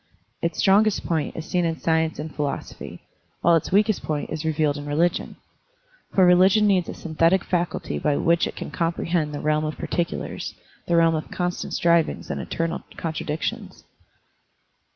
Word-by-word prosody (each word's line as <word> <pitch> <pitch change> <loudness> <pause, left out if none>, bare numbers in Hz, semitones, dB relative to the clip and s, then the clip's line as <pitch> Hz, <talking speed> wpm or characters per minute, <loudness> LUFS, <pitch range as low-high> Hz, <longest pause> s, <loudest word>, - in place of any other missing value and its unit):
Its 170 - -1
strongest 210 +2 +3
point 160 -4 -1
is 160 - -5
seen 180 +1 0
in 165 -1 -1
science 160 -1 +1
and 150 +1 -6
phi - - -4
losophy, 140 -1 -6 0.4
while 170 0 +5
its 165 - -1
weakest 210 +1 +3
point 150 -2 -3
is 155 0 -3
revealed 155 -2 +1
in 145 0 -6
religion. 165 +4 0 0.8
For 190 - +6
religion 185 +4 +5
needs 190 -4 +2
a - - -5
synthetic 165 +3 +2
faculty 175 -1 -2
by 145 -1 +1
which 170 0 +2
it - - -7
can - - -6
comprehend 165 -2 -1
the 145 - -5
realm 155 0 +1
of 155 0 -3
par - - -5
ticulars, 170 -1 -3 0.3
the 170 - +2
realm 165 -1 +5
of 155 -1 -3
constant 180 -1 -3
strivings 170 -1 +1
and - - -3
eternal 165 0 -3 0.2
contradictions. 155 -1 -4
165 Hz, 170 wpm, -24 LUFS, 155-175 Hz, 0.8 s, For